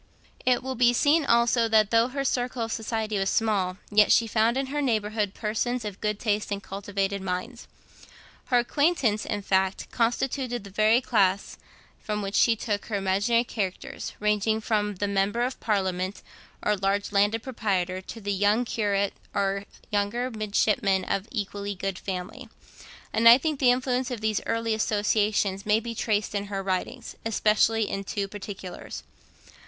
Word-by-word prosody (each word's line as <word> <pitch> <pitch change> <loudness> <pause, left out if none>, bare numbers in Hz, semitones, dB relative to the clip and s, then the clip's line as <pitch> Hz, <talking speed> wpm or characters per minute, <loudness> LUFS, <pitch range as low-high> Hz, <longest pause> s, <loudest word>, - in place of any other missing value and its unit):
It 250 0 +3
will 260 0 -3
be 240 -1 +4
seen 295 +5 +3
also 235 -1 +3
that 215 -2 +3
though 230 +1 +4
her 275 +2 -3
circle 250 -2 -1
of 225 - -4
society 220 -2 -2
was 195 0 +1
small, 195 -5 0
yet 210 0 +5
she 230 - +5
found 225 +2 +2
in 270 - 0
her 295 - 0
neighbourhood 215 -5 0
persons 230 +2 -2
of 205 -2 -6
good 210 -1 -1
taste 210 -2 -1
and 200 -1 -3
cultivated 200 0 -3
minds. 190 +6 -4 0.8
Her 250 - +2
acquaintance, 245 -4 +1
in 205 -2 -3
fact, 190 0 0
constituted 245 0 -1
the 200 - -11
very 215 +4 +4
class 200 -6 +1 0.4
from 210 -1 -3
which 195 0 -4
she 230 +2 +4
took 210 -2 -3
her 215 - -3
imaginary 200 +5 +2
characters, 200 -6 -4
ranging 210 +1 +1
from 210 -2 -1
the 205 +2 -2
member 200 +4 +1
of 255 +1 -3
parliament, 190 -2 -1 0.4
or 210 - +2
large 200 +1 -1
landed 205 +2 +2
proprietor, 190 -7 -1
to 225 - -9
the 205 -1 -2
young 205 +5 +2
curate 200 -3 0 0.2
or 200 0 0 0.3
younger 210 +5 0
midshipman 205 -3 +1
of 195 +2 -2
equally 205 -2 -4
good 190 0 -4
family; 190 +7 -6 0.6
and 230 +1 +6
I 235 - +10
think 305 0 -2
that 265 - +1
the - - +8
influence 255 0 0
of 245 -3 -4
these 215 -1 0
early 230 0 0
associations 205 -2 +1
may 210 +1 +4
be 230 +1 -5
traced 215 -2 -1
in 205 -1 -2
her 195 -1 -4
writings, 195 +6 -3
especially 220 0 +2
in 195 - -3
two 200 0 -3
particulars. 195 -2 -8
210 Hz, 165 wpm, -26 LUFS, 200-235 Hz, 0.8 s, I